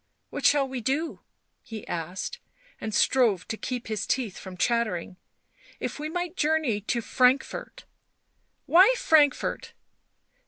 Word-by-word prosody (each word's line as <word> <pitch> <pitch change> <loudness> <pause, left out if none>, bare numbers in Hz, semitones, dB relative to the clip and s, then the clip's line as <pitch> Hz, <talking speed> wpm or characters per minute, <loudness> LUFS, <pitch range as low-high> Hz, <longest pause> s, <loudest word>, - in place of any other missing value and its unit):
" - - -49
What - - +2
shall 285 -2 +3
we 260 -2 -5
do?" 285 +8 -1 0.4
he 225 -4 -9
asked, 175 - -4 0.4
and 220 - -4
strove 220 -4 +2
to - - -2
keep 250 +2 -5
his 215 -1 -3
teeth 240 -7 -1
from 185 -1 -9
chattering. 210 -5 0 0.6
"If - - -4
we 305 +1 -3
might 355 +1 -3
journey 300 - +1
to 235 +3 -1
Frankfort 255 +3 +1 0.4
" - - -47 0.3
"Why 380 +9 +6
Frankfort?" 295 -7 +2
250 Hz, 135 wpm, -26 LUFS, 215-300 Hz, 0.6 s, Why